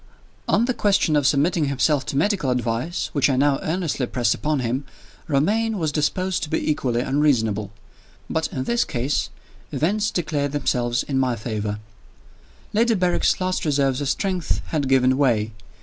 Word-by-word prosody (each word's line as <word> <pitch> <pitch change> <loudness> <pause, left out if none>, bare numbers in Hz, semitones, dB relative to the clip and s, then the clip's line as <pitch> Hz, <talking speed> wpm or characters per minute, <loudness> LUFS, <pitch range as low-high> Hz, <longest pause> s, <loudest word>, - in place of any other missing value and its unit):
X. - - -28 0.5
ON 230 - +3
the 255 - 0
question 195 -8 +2
of 145 -2 +3
submitting 155 +3 +2
himself 140 +1 +1
to 135 - -2
medical 185 -3 +1
advice 125 +6 -1
(which 145 -1 +3
I 135 - +2
now 140 +1 +2
earnestly 160 -6 -1
pressed 120 -3 +1
upon 150 -2 -1
him), 125 +3 -1 0.4
Romayne 210 +10 +1
was 160 -4 -1
disposed 185 +5 0
to 155 - -4
be 155 - 0
equally 125 -5 0
unreasonable. 115 -8 +1 0.6
But 160 - -1
in 130 - -4
this 235 - +1
case, 130 +3 -1 0.4
events 205 +7 0
declared 150 -4 -2
themselves 120 -4 0
in 135 -2 -1
my 130 -2 +1
favor. 105 -2 -3 1.0
Lady 230 +2 +3
Berrick's 180 -2 +1
last 185 0 -1
reserves 140 -3 +1
of 140 - -1
strength 185 -1 -1
had 145 -4 -1
given 130 0 +3
way. 115 -6 +2
145 Hz, 165 wpm, -23 LUFS, 130-175 Hz, 1.0 s, ON